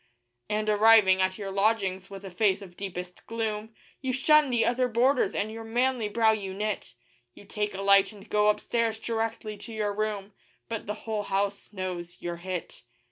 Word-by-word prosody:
And, 215 Hz, 0 st, -1 dB
arriving 210 Hz, -3 st, +6 dB
at 185 Hz, 0 st, +1 dB
your 200 Hz, -2 st, -5 dB
lodgings, 195 Hz, -2 st, 0 dB
with 195 Hz, 0 st, -9 dB
a 190 Hz, -, -7 dB
face 200 Hz, +1 st, +1 dB
of 180 Hz, -2 st, -13 dB
deepest 180 Hz, -2 st, -7 dB
gloom, 220 Hz, -1 st, -3 dB, 0.3 s
You 260 Hz, -1 st, -1 dB
shun 300 Hz, +2 st, +4 dB
the 240 Hz, -2 st, +2 dB
other 250 Hz, +1 st, +2 dB
boarders 250 Hz, +3 st, +2 dB
and 215 Hz, +2 st, -1 dB
your 225 Hz, +1 st, -7 dB
manly 240 Hz, 0 st, 0 dB
brow 225 Hz, +1 st, +4 dB
you 195 Hz, -3 st, -3 dB
knit; 210 Hz, -, -3 dB, 0.4 s
You -, -, -14 dB
take 210 Hz, 0 st, -3 dB
a 195 Hz, -, -4 dB
light 200 Hz, 0 st, +5 dB
and 205 Hz, -1 st, -14 dB
go 210 Hz, 0 st, +3 dB
upstairs 225 Hz, +1 st, 0 dB
directly 225 Hz, -1 st, -3 dB
to 230 Hz, -, -9 dB
your 210 Hz, -2 st, -1 dB
room 210 Hz, -1 st, -3 dB, 0.3 s
But 225 Hz, -3 st, -5 dB
the 210 Hz, -, -2 dB
whole 220 Hz, -2 st, -1 dB
house 200 Hz, 0 st, -2 dB
knows 180 Hz, -3 st, -5 dB
you're 175 Hz, 0 st, -4 dB
hit. 180 Hz, 0 st, -6 dB
210 Hz, 185 wpm, -28 LUFS, 195-225 Hz, 0.4 s, arriving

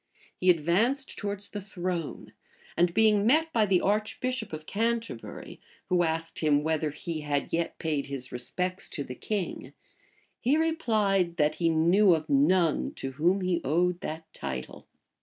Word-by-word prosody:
He 185 Hz, -, +1 dB
advanced 190 Hz, -, +2 dB
towards 200 Hz, 0 st, -4 dB
the 205 Hz, -, -5 dB
throne; 180 Hz, -4 st, -4 dB, 0.4 s
and 175 Hz, 0 st, +3 dB
being 210 Hz, +1 st, +4 dB
met 320 Hz, +5 st, +3 dB
by 220 Hz, -3 st, +3 dB
the 185 Hz, -2 st, +3 dB
archbishop 215 Hz, +5 st, -1 dB
of 155 Hz, 0 st, -7 dB
Canterbury, 225 Hz, -, -3 dB, 0.3 s
who 180 Hz, -1 st, +3 dB
asked 165 Hz, 0 st, -1 dB
him, 150 Hz, -2 st, +3 dB
whether 155 Hz, -1 st, 0 dB
he 155 Hz, +2 st, -5 dB
had 145 Hz, -1 st, -2 dB
yet 170 Hz, 0 st, -1 dB
paid 150 Hz, -4 st, -2 dB
his 135 Hz, -2 st, -6 dB
respects 180 Hz, +9 st, -2 dB
to 145 Hz, -, -3 dB
the 125 Hz, -, -7 dB
king, 195 Hz, -, -4 dB, 0.7 s
he 270 Hz, +5 st, +2 dB
replied, 215 Hz, -, +1 dB
that 150 Hz, -2 st, +3 dB
he 165 Hz, -, +4 dB
knew 170 Hz, +4 st, +5 dB
of 155 Hz, -1 st, -4 dB
none 185 Hz, -, +2 dB
to 135 Hz, -, -4 dB
whom 175 Hz, +8 st, +1 dB
he 180 Hz, -2 st, 0 dB
owed 175 Hz, +5 st, +1 dB
that 160 Hz, +1 st, -5 dB
title. 65 Hz, -2 st, -6 dB
180 Hz, 155 wpm, -28 LUFS, 155-210 Hz, 0.7 s, knew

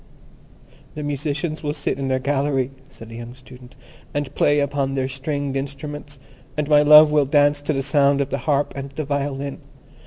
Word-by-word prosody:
"The 150 Hz, -, -5 dB
musicians 150 Hz, +2 st, -3 dB
will 145 Hz, -1 st, -2 dB
sit 145 Hz, -, -2 dB
in 135 Hz, -, -2 dB
their 130 Hz, 0 st, +1 dB
gallery," 135 Hz, -1 st, 0 dB, 0.2 s
said 115 Hz, -4 st, -13 dB
the 115 Hz, -, -9 dB
young 120 Hz, +1 st, -9 dB
Student, 125 Hz, -1 st, -15 dB, 0.4 s
"and 145 Hz, -2 st, -2 dB
play 145 Hz, 0 st, +3 dB
upon 140 Hz, -1 st, -1 dB
their 130 Hz, -1 st, 0 dB
stringed 140 Hz, +1 st, -3 dB
instruments, 145 Hz, +1 st, -6 dB, 0.4 s
and 150 Hz, -1 st, -1 dB
my 150 Hz, -1 st, +5 dB
love 150 Hz, +1 st, +8 dB
will 150 Hz, -2 st, +3 dB
dance 145 Hz, 0 st, +3 dB
to 145 Hz, +2 st, -1 dB
the 135 Hz, -1 st, -1 dB
sound 140 Hz, 0 st, +3 dB
of 140 Hz, 0 st, -1 dB
the 140 Hz, -, -1 dB
harp 145 Hz, 0 st, +1 dB
and 140 Hz, 0 st, -5 dB
the 150 Hz, +2 st, -5 dB
violin. 140 Hz, -1 st, -3 dB
140 Hz, 185 wpm, -22 LUFS, 135-145 Hz, 0.4 s, love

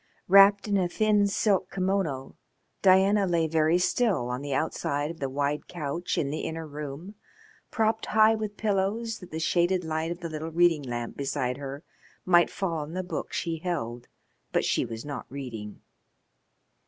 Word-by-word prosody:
Wrapped 200 Hz, +2 st, +7 dB
in 205 Hz, -1 st, +2 dB
a 185 Hz, -2 st, +2 dB
thin 210 Hz, +2 st, +2 dB
silk 195 Hz, -2 st, +1 dB
kimono 185 Hz, -8 st, -2 dB, 0.5 s
Diana 195 Hz, +1 st, +5 dB
lay 170 Hz, -2 st, +2 dB
very 160 Hz, +1 st, +3 dB
still 180 Hz, -, +1 dB
on 125 Hz, +1 st, -3 dB
the 145 Hz, 0 st, -5 dB
outside 145 Hz, +1 st, -1 dB
of 165 Hz, -, -11 dB
the 135 Hz, -, -2 dB
wide 145 Hz, +2 st, -2 dB
couch 170 Hz, +1 st, -3 dB
in 140 Hz, -2 st, 0 dB
the 155 Hz, -, -3 dB
inner 160 Hz, 0 st, -4 dB
room, 150 Hz, +5 st, -7 dB, 0.6 s
propped 220 Hz, -1 st, 0 dB
high 220 Hz, 0 st, +5 dB
with 215 Hz, -2 st, -4 dB
pillows 215 Hz, +2 st, -1 dB
that 180 Hz, -, -12 dB
the 160 Hz, -, -5 dB
shaded 175 Hz, +2 st, +1 dB
light 160 Hz, 0 st, -2 dB
of 170 Hz, +1 st, -5 dB
the 170 Hz, -, -3 dB
little 155 Hz, +1 st, -5 dB
reading 165 Hz, -1 st, +3 dB
lamp 120 Hz, -3 st, -5 dB
beside 135 Hz, -2 st, -2 dB
her 140 Hz, +2 st, -7 dB, 0.4 s
might 175 Hz, -1 st, +5 dB
fall 170 Hz, -5 st, -2 dB
on 150 Hz, +2 st, -6 dB
the 185 Hz, +1 st, -2 dB
book 180 Hz, -, -5 dB
she 165 Hz, -2 st, -2 dB
held, 125 Hz, -9 st, -4 dB, 0.4 s
but -, -, +1 dB
she -, -, +1 dB
was 115 Hz, +2 st, -7 dB
not 145 Hz, -1 st, -6 dB
reading. 115 Hz, -6 st, -7 dB
165 Hz, 170 wpm, -27 LUFS, 145-195 Hz, 0.6 s, Wrapped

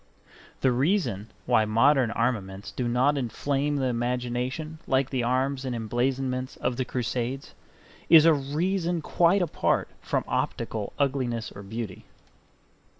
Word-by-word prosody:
The 130 Hz, -, +4 dB
reason 125 Hz, -, 0 dB, 0.2 s
why 120 Hz, -3 st, +4 dB
modern 125 Hz, +4 st, +4 dB
armaments 100 Hz, -5 st, -2 dB
do 120 Hz, +4 st, -2 dB
not 130 Hz, +4 st, +2 dB
inflame 140 Hz, +4 st, -1 dB
the 135 Hz, -2 st, 0 dB
imagination 125 Hz, +5 st, -2 dB
like 130 Hz, 0 st, +1 dB
the 130 Hz, -2 st, 0 dB
arms 130 Hz, +3 st, 0 dB
and 130 Hz, -2 st, -3 dB
emblazonments 130 Hz, +3 st, -1 dB
of 120 Hz, -, -2 dB
the 130 Hz, -, -1 dB
Crusades 125 Hz, +2 st, -3 dB, 0.6 s
is 160 Hz, -1 st, +9 dB
a 165 Hz, -, +7 dB
reason 165 Hz, +4 st, -1 dB
quite 175 Hz, +4 st, +3 dB
apart 165 Hz, -, 0 dB
from -, -, -1 dB
optical 105 Hz, -3 st, -2 dB
ugliness 130 Hz, -5 st, -1 dB
or 100 Hz, -, -10 dB
beauty. 105 Hz, -1 st, -6 dB
130 Hz, 130 wpm, -27 LUFS, 120-140 Hz, 0.6 s, is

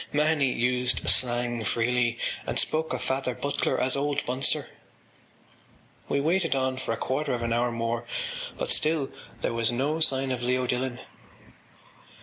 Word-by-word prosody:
Mahony 150 Hz, -2 st, +2 dB
used 125 Hz, 0 st, 0 dB
slang 120 Hz, -2 st, +2 dB
freely, 120 Hz, +2 st, +1 dB, 0.3 s
and -, -, -1 dB
spoke 160 Hz, +1 st, +1 dB
of -, -, -2 dB
Father 130 Hz, -2 st, -1 dB
Butler 145 Hz, 0 st, -1 dB
as 130 Hz, -, +3 dB
Old 145 Hz, +1 st, -1 dB
Bunser. 130 Hz, +2 st, +1 dB, 1.4 s
We 140 Hz, -, +2 dB
waited 165 Hz, +1 st, +1 dB
on 130 Hz, -1 st, 0 dB
for 130 Hz, -, -3 dB
a 115 Hz, -, -1 dB
quarter 135 Hz, +2 st, -1 dB
of 120 Hz, -, -4 dB
an 115 Hz, 0 st, 0 dB
hour 120 Hz, +1 st, +1 dB
more 115 Hz, 0 st, -2 dB, 0.5 s
but -, -, -1 dB
still 155 Hz, -3 st, +2 dB, 0.3 s
there -, -, 0 dB
was 115 Hz, 0 st, +2 dB
no 140 Hz, +6 st, 0 dB
sign 135 Hz, -4 st, +2 dB
of 125 Hz, -1 st, -2 dB
Leo 125 Hz, +1 st, +1 dB
Dillon. 125 Hz, 0 st, -2 dB
130 Hz, 150 wpm, -27 LUFS, 120-140 Hz, 1.4 s, as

